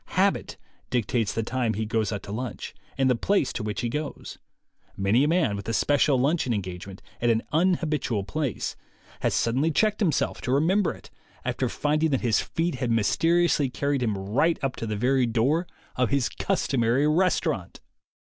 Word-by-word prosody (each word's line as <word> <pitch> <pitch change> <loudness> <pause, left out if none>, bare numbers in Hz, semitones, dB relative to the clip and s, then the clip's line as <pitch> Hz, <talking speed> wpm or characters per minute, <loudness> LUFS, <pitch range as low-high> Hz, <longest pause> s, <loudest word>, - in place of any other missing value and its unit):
Habit - - +1 0.3
dictates 115 -3 0
the 115 - -2
time 120 -1 -1
he 110 +1 -2
goes 110 0 0
out 100 -2 -4
to 100 - -8
lunch, 120 +2 -5 0.2
and 135 -1 +3
the 130 - +4
place 150 - +1
to - - -3
which 105 -2 -3
he 120 - -1
goes. 150 +5 -5 0.6
Many 100 +7 +3
a - - +3
man 160 - +2
with 100 +2 -6
a - - -1
special 145 +2 +3
luncheon 135 -3 +1
en 100 - -2
gagement 95 +1 -8 0.2
at 120 - +2
an 115 -1 +2
unhabitual 155 - +1
place 145 -2 -3 0.4
has - - 0
suddenly 130 +7 +1
checked 210 +6 +1
himself 175 -10 0
to 125 - -2
remember 170 +7 +2
it, - - -13 0.3
after - - -1
finding 155 +2 +1
that 135 -3 0
his 115 -3 +2
feet 170 +1 -1
had 125 - 0
mysteriously 160 +6 +2
carried 140 +1 -1
him 110 -5 0
right 125 +13 +1
up 135 -2 -1
to 115 - -4
the 105 - -2
very 125 +2 +2
door 135 +10 +1 0.3
of 125 -2 +1
his 140 -4 +1
customary 125 +2 +1
restaurant! 175 +4 0
130 Hz, 180 wpm, -26 LUFS, 115-155 Hz, 0.6 s, the